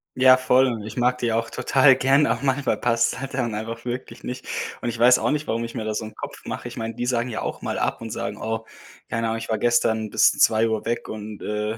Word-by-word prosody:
Ja, 130 0 +7
voll 130 0 +4
und 115 -4 -3
ich 110 +2 -8
mag 125 +1 +2
die 120 -2 0
auch 115 +1 -1
total 135 0 +4
gern, 135 +3 +3
aber - - 0
manchmal 135 0 +1
passt's 115 0 +1
halt 135 0 -6
dann 120 -4 -1
einfach 115 +2 -5
wirklich 125 +1 -6
nicht. 125 0 -6 0.4
Und 120 - -2
ich 120 - -4
weiß 125 +2 +6
auch - - 0
nicht, 150 0 -1
warum 115 +1 -1
ich 115 +1 -7
mir 110 -3 -3
da 110 - -2
so 105 - -3
'n 110 - -9
Kopf - - -8
mache. - - -5
Ich 120 - -9
meine, 115 -1 -4
die 120 - -3
sagen 125 0 0
ja 110 - -4
auch - - -4
mal - - -3
ab - - -1
und 115 - -6
sagen: 105 -1 -4
„Oh, 110 0 -3 0.4
keine 115 0 -1
Ahnung, 115 0 -1
ich 115 - -7
war 110 - 0
gestern 110 -2 +2
bis - - +4
2:00 110 0 +2
weg 120 +1 -2
und, 105 -1 -7
äh, 105 +1 -2
115 Hz, 260 wpm, -23 LUFS, 110-125 Hz, 0.4 s, Ja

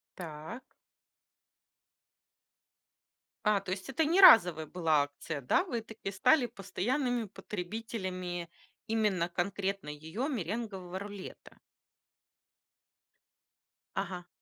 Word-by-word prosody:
Так. 165 +9 -8 2.7
А, 210 -1 +4
то 185 - -6
есть 190 +5 -4
это 295 +4 +1
не 340 +5 +3
разовая 175 - +8
была 160 -3 +2
акция, 145 +1 -6
да? 130 - +3
Вы 245 - -3
таки 220 -3 -7
стали 250 +8 +4
постоянными 245 +4 -1
потребителями 185 -3 -5 0.4
именно 210 -6 +1
конкретно 195 0 -2
ее 160 - -4
меренгового 195 - -4
рулета. 200 -1 -9 2.3
Ага. 180 -2 -4
195 Hz, 85 wpm, -31 LUFS, 175-225 Hz, 2.7 s, разовая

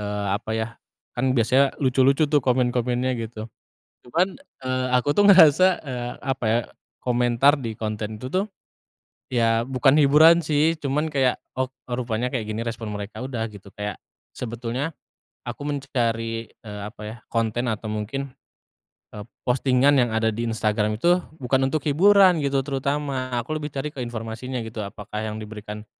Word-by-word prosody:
eee, 105 0 -3
apa 105 +2 -3
ya, 110 +1 -1 0.4
kan 130 +2 0
biasanya 130 +4 +3
lucu-lucu 135 +2 +3
tuh 145 0 +3
komen-komennya 125 0 +1
gitu. 110 -1 -6 0.6
Cuman, 180 +10 0 0.3
eee, 130 0 0
aku 145 +4 +1
tuh 205 - +4
ngerasa, 185 -1 +8 0.2
eee, 125 -2 -4
apa 135 -3 -2
ya, 115 +2 +3 0.5
komentar 125 +3 +3
di 115 -3 -5
konten 110 0 -4
itu 125 - -6
tuh, 195 +3 0 0.8
ya 115 -1 +2
bukan 135 +2 +3
hiburan 155 +3 +6
sih, 155 +2 +2
cuman 150 +1 -1
kayak, 135 -3 +1 0.2
"Oh, 130 - +2 0.2
rupanya 120 -1 -1
kayak 120 -4 -3
gini 110 +2 -3
respon 115 -1 -4
mereka." 105 +5 -6
Udah 115 -4 -3
gitu, 100 -2 -14
kayak 105 0 -5 0.4
sebetulnya 120 +6 -4 0.5
aku - - -5
mencari, 115 -5 -2
eee, 105 -2 -10
apa 105 +1 -9
ya, 110 - -7
konten 115 +2 -1
atau 110 0 -5
mungkin, 125 +6 -4 0.8
eee, 105 -1 -7 0.2
postingan 130 +2 +3
yang 120 - 0
ada 110 0 +2
di 115 +1 -2
Instagram 105 -1 0
itu 175 +6 +4 0.2
bukan 135 +1 +1
untuk 155 -1 -1
hiburan 185 +3 +5
gitu 140 -1 +1
terutama. 140 -1 -2
Aku 120 +7 -3
lebih 150 -1 -3
cari 140 +2 -4
ke 135 - -6
informasinya 120 +1 -5
gitu, 110 -1 -6
apakah 105 +1 -6
yang 110 0 -4
diberikan 105 0 -8
125 Hz, 155 wpm, -24 LUFS, 110-140 Hz, 0.8 s, ngerasa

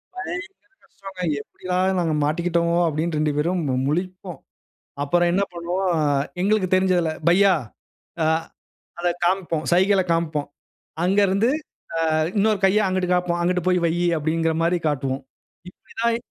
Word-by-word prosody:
பயங்கர 385 -2 -7
கஷ்டங்க! 195 -2 -9 0.2
"எப்டிலாம் 185 +3 -1
நாங்க 165 -3 0
மாட்டிக்கிட்டோம்"அப்டின் 170 0 0
2 150 0 +1
பேரும் 175 +4 0
மு 130 - 0
முழிப்போம். 180 +3 -3 0.6
அப்பறம் 175 +4 +2
என்ன 195 +2 +2
பண்ணுவோம்! 175 +2 -1 0.5
எங்களுக்கு 200 -2 +2
தெரிஞ்சதில 185 -3 +2 0.2
"பையா" 195 +2 +5 0.7
ஆ - - +2 0.7
அதை 175 0 +1
காம்ப்போம். 175 -3 0
சைகைல 190 +2 +4
காம்ப்போம். 155 -3 -1 0.6
அங்கருந்து 200 +4 +3 0.7
அ - - +3 0.2
இன்னொரு 210 0 +2
கைய 200 +3 +4
அங்குட்டு 185 -1 0
காம்ப்போம். 175 -1 0
"அங்குட்டு 180 0 0
போய் 180 -1 +2
வையு" 175 +2 0
அப்படிங்கிற 160 +1 0
மாரி 175 +1 +2
காட்டுவோம். 135 -2 -2 0.5
இப்புடி 180 - -18
தான் 235 0 +2
180 Hz, 125 wpm, -22 LUFS, 165-190 Hz, 0.7 s, பையா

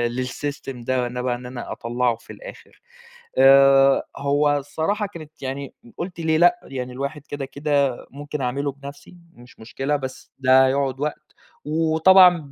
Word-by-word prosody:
للسِّيستم 130 0 -5
ده 125 0 -1
بقى 125 -1 -1
إن 125 +1 -10
أنا 125 -1 -7
أطلّعُه 120 0 -1
في 115 - -13
الآخر، - - -13 0.6
آآ 135 0 +6
هو 145 +1 +1
الصراحة 160 +9 -2
كانت 155 -3 -13
يعني 135 0 -5 0.2
قُلت 175 -1 -6
ليه 160 -1 +1
لأ، 175 +8 +4
يعني 125 -2 -6
الواحد 140 +3 -5
كده 145 -1 -5
كده 140 -2 0
ممكن 145 +1 -6
أعملُه 140 +3 -2
بنفسي، 140 +4 -12 0.2
مش 125 +1 -18
مشكلة 135 +6 -3
بس 130 -2 -7
ده 130 0 +5
هيقعد 135 -1 -1
وقت، 150 +1 -5 0.3
وطبعًا 165 +4 +5
140 Hz, 145 wpm, -22 LUFS, 130-150 Hz, 0.6 s, آآ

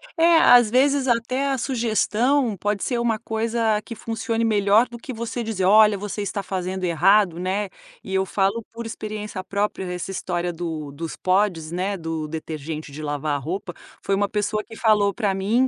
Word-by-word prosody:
É, 335 0 +5
às 245 -7 +7
vezes 275 +2 +3
até 250 +3 +1
a 270 - 0
sugestão 240 0 +1
pode 205 +2 -1
ser 245 -2 -1
uma 230 -2 0
coisa 225 -1 0
que 230 - -8
funcione 225 +1 -2
melhor 210 +2 +4
do 240 - -9
que 250 +3 -8
você 235 +1 -4
dizer: 215 -5 -2
"Olha, 210 +1 +6
você 205 +1 -4
está 200 0 -3
fazendo 185 0 -4
errado", 180 +1 +3
né, 190 +3 -1 0.3
e 190 - -7
eu 190 0 +2
falo 200 +4 0
por 230 0 -7
experiência 210 -3 -5
própria, 200 0 -2
essa 180 +2 -4
história 175 -2 -2
do 160 -4 -5
dos 160 +3 -6
pods, 185 -4 +1
né, 190 +3 -2
do 165 -2 -4
detergente 155 -1 -6
de 150 +2 -8
lavar 145 -1 -2
roupa, 175 +4 -4 0.3
foi 195 - 0
uma 200 0 0
pessoa 210 +1 -1
que 225 - -12
falou 210 -3 +3
para 205 -3 0
mim, 215 +7 +2
205 Hz, 180 wpm, -23 LUFS, 180-230 Hz, 0.3 s, às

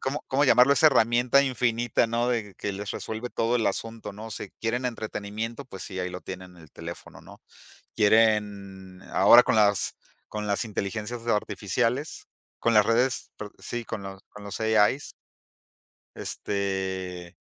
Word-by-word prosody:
¿Cómo 135 +3 -3
cómo 140 +2 +2
llamarlo? 125 +2 +6
Esa 155 +3 +5
herramienta 125 0 +4
infinita, 120 -3 +1
¿no?, 120 +2 0
de 110 -5 -2
que 100 - -4
les 100 +1 -5
resuelve 110 +2 -5
todo 115 0 0
el 115 - 0
asunto, 115 +1 -3
¿no?, 110 +2 -8
si 105 - -6
quieren 120 +3 -1
entretenimiento, 110 +2 -5
pues 95 -7 -9
sí, 95 -2 -7
ahí 90 - -2
lo 90 0 -8
tienen 90 -1 -9
en 85 - -15
el 80 - -17
teléfono, 85 +1 -9
¿no?, - - -15 0.5
quieren 100 -3 +1
ahora 120 +5 +8
con - - +1
las 105 -2 +2 0.3
con 105 -1 -5
las 100 +4 0
inteligencias 110 +3 -4
artificiales, 115 - -1 0.3
con 115 - +2
las 105 -1 +6
redes, 120 +2 +1
pero 105 -1 -7
sí, 120 -1 -5
con 100 - -5
los 95 0 -8
con 105 - -12
los 100 +1 -6
AI. 110 +4 +2 1.1
Este, 95 -3 -3
110 Hz, 160 wpm, -26 LUFS, 100-120 Hz, 1.1 s, ahora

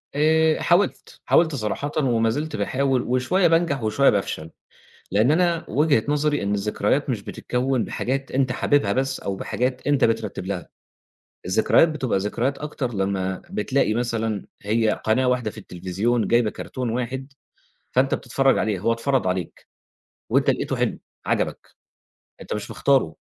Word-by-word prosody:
آآ، 160 +1 +3
حاولت، 180 +3 +1
حاولت 160 -3 +3
صراحةً 135 +5 -3
وما 115 -6 +2
زلت 150 +7 -3
باحاول، 130 +5 0
وشوية 130 +10 +2
بانجح 165 -7 +1
وشوية 135 +6 +3
بافشل، 80 -5 -2 0.6
لإن 110 +6 +3
أنا 170 +1 +2
وجهة 145 -5 +3
نظري 150 -2 +1
إن 100 +1 0
الذكريات 105 +7 0
مش 105 -5 -2
بتتكوّن 125 +2 -1
بحاجات 135 +2 -3
أنت 130 -1 +1
حاببها 145 +2 +2
بس، 135 +1 -1
أو 100 -1 -3
بحاجات 125 +5 -2
أنت 145 -1 +3
بترتّب 115 -4 -1
لها، 95 -3 -4 0.8
الذكريات 110 - +4
بتبقى 135 -9 -1
ذكريات 120 +7 -1
أكتر 145 -5 -4
لمّا 95 -1 -1
بتلاقي 110 +1 0
مثلًا 115 -3 -2 0.2
هي 110 +2 +1 0.2
قناة 120 +4 +2
واحدة 125 -4 0
في - - -16
التلفزيون، 100 +5 -1
جايبة 120 -2 +3
cartoon - - -11
واحد 130 +4 -4 0.6
فأنت 130 +2 +2
بتتفرّج 135 +2 +1
عليه، 105 -3 0
هو 110 +5 +1
اتفرض 130 -1 0
عليك، 90 -2 -4 0.6
وأنت - - +3
لقيتُه - - -1
حلو - - -1 0.3
عَجَبك، - - -1 0.7
أنت - - -5
مش 105 - -5
مختارُه 130 - +2
125 Hz, 145 wpm, -23 LUFS, 105-140 Hz, 0.8 s, الذكريات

